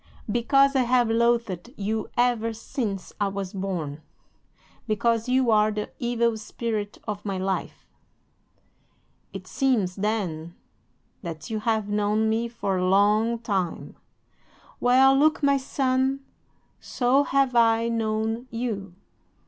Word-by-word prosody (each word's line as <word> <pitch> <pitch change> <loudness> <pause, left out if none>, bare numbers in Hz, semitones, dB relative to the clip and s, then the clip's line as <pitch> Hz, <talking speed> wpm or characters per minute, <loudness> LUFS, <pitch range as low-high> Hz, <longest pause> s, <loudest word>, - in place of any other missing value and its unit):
"'"Because 275 +4 +3
I 265 - +4
have 245 -2 +2
loathed 235 -4 +1
you 215 +2 -2
ever 240 -2 +1
since 215 -4 -4
I 205 - +3
was 195 0 -5
born. 175 -7 -4 0.9
Because 230 +2 0
you 255 -2 +3
are 215 0 +4
the 210 0 -4
evil 235 -2 0
spirit 215 -1 -4
of 205 -1 -4
my 195 -2 -3
life." 190 +1 -3 1.5
"'"It - - -8
seems, 225 -10 0
then, 180 -6 -2 0.7
that 165 0 -7
you 220 - -1
have 220 -1 0
known 210 +1 +1
me 225 +2 0
for 205 -5 -2
a 185 0 +1
long 210 +4 +3
time. 195 -7 -3 0.8
Well, 260 +2 +5
look, 305 +2 +3
my 280 0 +4
son, 265 0 0 0.6
so 255 +2 +2
have 275 -3 +1
I 230 0 +4
known 225 +1 -1
you." 215 -6 -4
225 Hz, 125 wpm, -25 LUFS, 205-245 Hz, 1.5 s, Well